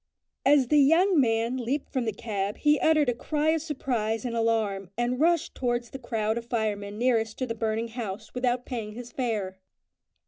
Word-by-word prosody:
As 275 -3 +5
the 300 - +5
young 330 +5 +5
man 230 0 +1
leaped 260 +4 -3
from 255 -3 0
the 220 - 0
cab 205 -2 -3
he 300 -1 +3
uttered 310 -3 +3
a 245 - +2
cry 300 +5 -1
of 320 0 +2
surprise 250 -7 -2
and 235 -1 -2
alarm, 220 -5 0
and 240 +1 0
rushed 335 +1 +2
towards 240 -2 -2
the 270 - -7
crowd 225 -2 -1
of 235 - -11
firemen 210 -3 -2
nearest 225 -2 +1
to 260 - -1
the 230 - -3
burning 225 0 -2
house 220 -3 -6
without 250 0 0
paying 225 -4 -5
his 240 +1 -9
fare. 210 -7 -2
240 Hz, 185 wpm, -27 LUFS, 220-265 Hz, -, As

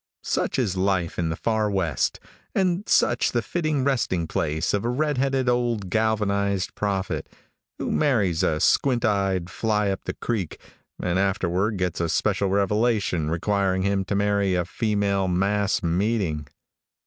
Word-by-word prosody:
Such - - -1
is 110 -8 0
life 95 -3 0
in 85 -2 0
the 80 - -1
far 110 +2 0
west, 85 -9 0 0.4
and 185 +1 0
such 120 0 +3
the 120 -1 +1
fitting 155 +1 -1
resting 115 -11 0
place 80 0 -1
of 100 - 0
a 120 - 0
red 145 +2 0
headed 135 -1 +1
old 120 -6 0
galvanized 100 -3 0
prophet, 100 -2 -2 0.5
who - - -3
marries 105 - +2
a 75 -1 +1
squint 120 - +2
eyed 95 -4 +1
fly 105 -3 0
up 95 - -5
the - - -3
creek, 105 -9 -3 0.4
and 90 +1 0
afterward 95 +2 0
gets 90 -2 -1
a 85 - 0
special 100 +3 +1
revelation 100 -4 +1
requiring 95 +2 0
him 100 0 +1
to 100 - -2
marry 100 -1 +1
a 90 -1 0
female 100 -1 0
mass 100 +3 +1
meeting. 85 -3 0
100 Hz, 150 wpm, -24 LUFS, 90-110 Hz, 0.5 s, such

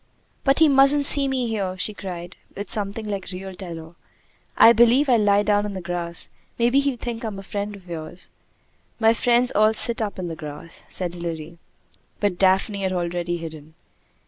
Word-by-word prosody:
"But 275 0 +3
he 320 - +6
mustn't 280 +1 +5
see 280 -1 +6
me 260 -2 -1
here!" 195 -4 -3
she 210 +3 -1
cried, 180 -3 -7 0.2
with 205 - -5
something 210 0 -2
like 200 -2 -4
real 190 +1 -7
terror. 170 -3 -9 0.6
"I 230 - +8
believe 240 +5 +4
I'll 245 -3 +4
lie 205 -1 +3
down 205 0 +2
in 205 -1 -5
the - - -4
grass. 175 -1 -3 0.3
Maybe 240 +3 +3
he'll 280 -3 0
think 235 0 -5
I - - -2
am 205 -3 -6
a 195 - -8
friend 205 +1 -4
of 190 -2 -16
yours." 170 +1 -7 0.7
"My 225 0 +5
friends 245 +1 +2
all 215 +1 +4
sit 235 +1 0
up 210 -2 -3
in 185 -2 -4
the 165 - -5
grass," 155 +2 -9
said 180 -2 -4
Hilary. 170 -1 -6 0.6
But 200 -4 -1
Daphne 195 +2 +2
had 190 -1 -1
already 175 -1 -2
hidden. 160 -2 -10
200 Hz, 190 wpm, -23 LUFS, 175-230 Hz, 0.7 s, I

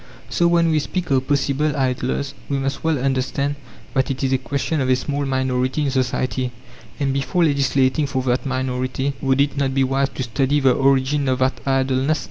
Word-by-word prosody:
So 175 - +3
when 170 -1 +3
we 155 - +3
speak 175 +2 -3
of 130 -1 +2
possible 145 +1 +1
idlers, 130 +1 -1 0.2
we 140 - 0
must 135 0 -3
well 160 -2 +2
understand 135 +2 -1 0.4
that 130 -1 +1
it 135 0 -3
is 135 0 +1
a 130 - +2
question 140 +3 -2
of 130 - 0
a 130 - +5
small 140 +2 -2
minority 130 +1 0
in 140 - 0
society; 130 -1 -1 0.5
and 135 -2 0
before 140 +6 0
legislating 140 -1 +2
for 130 -2 -2
that 125 0 0
minority, 130 0 -2
would 135 -1 +1
it 140 0 +1
not 135 -1 0
be 135 - +3
wise 135 +1 +1
to 130 - -2
study 135 +4 +1
the 135 -2 +4
origin 135 +1 +2
of 130 - +1
that 130 +1 0
idleness? 135 +2 +1
135 Hz, 195 wpm, -21 LUFS, 130-140 Hz, 0.5 s, a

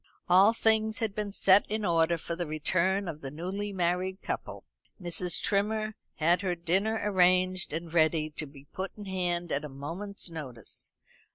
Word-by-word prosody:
All 190 +4 +7
things 220 -1 +2
had 225 -4 -2
been 210 -1 -3
set 195 0 +5
in 215 0 -1
order 165 -1 +3
for 170 +1 -5
the 175 -1 -3
return 185 +5 +1
of 155 -2 -6
the 135 - -5
newly 185 +7 -4
married 185 +1 -1
couple. - - -5 0.3
Mrs. 175 -1 0
Trimmer 215 +2 0 0.2
had 170 +3 +2
her 185 -3 -1
dinner 190 +6 0
arranged 185 -2 +3
and 165 +1 -5
ready 155 -1 +2
to 150 0 -3
be 140 0 -15
put 190 0 -4
in 205 - -8
hand 175 -3 -1
at 140 - 0
a 150 - -6
moment's 170 +11 -5
notice. 135 - -7
180 Hz, 170 wpm, -29 LUFS, 165-200 Hz, 0.3 s, All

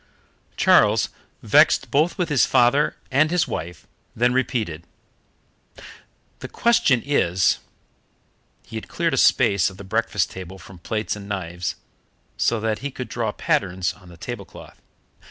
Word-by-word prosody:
Charles, - - +4 0.3
vexed - - +4
both 155 +7 +2
with 180 -3 -1
his 145 -4 +3
father 130 +5 +3 0.2
and 150 +4 +3
his 180 0 +1
wife, 85 +2 -6 0.3
then 120 +2 +2
repeated: 110 - -2 1.5
"The - - -7
question 150 - +2
is 95 -11 +2 0.5
" - - -42
He - - -7
had - - -7
cleared - - -1
a - - 0
space 100 -2 +4
of 95 - -14
the - - -9
breakfast 105 -2 -1
table 95 0 -9
from 90 0 -14
plates 105 +5 -3
and 100 -1 -10
knives, 90 -2 -4 0.6
so 115 - +1
that 110 -1 -1
he 140 +4 -4
could 130 -3 -7
draw 115 -2 -2
patterns 95 -2 -1
on 90 -3 -18
the 85 - -14
tablecloth. 105 +1 -9
105 Hz, 145 wpm, -22 LUFS, 95-130 Hz, 1.5 s, Charles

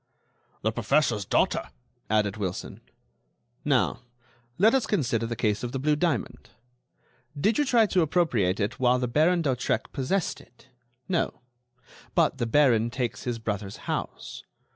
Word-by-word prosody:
"The 110 - +2
professor's 120 -2 +1
daughter," 65 - +1 0.4
added 105 -1 +1
Wilson. 95 -4 -5 0.8
"Now, 140 -4 +1 0.6
let 215 +5 +5
us 265 -3 +2
consider 120 - 0
the 115 - -3
case 105 -2 0
of 120 - -4
the - - -1
blue 150 +3 +2
diamond. 150 - -2 0.9
Did 215 - +2
you 295 - +3
try 235 -4 +4
to 185 -3 +2
appropriate 135 - +1
it 105 +2 -2
while 125 -1 +4
the 125 0 -1
Baron 160 +7 +2
d'Hautrec 130 -4 -1
possessed 155 +7 -1
it? 125 +2 -23 0.4
No. 175 -3 -1 0.7
But - - +2
the 120 - 0
baron 120 -3 +3
takes 120 -2 -3
his 120 -2 -2
brother's 105 -3 -4
house. - - -5
125 Hz, 140 wpm, -26 LUFS, 110-155 Hz, 0.9 s, let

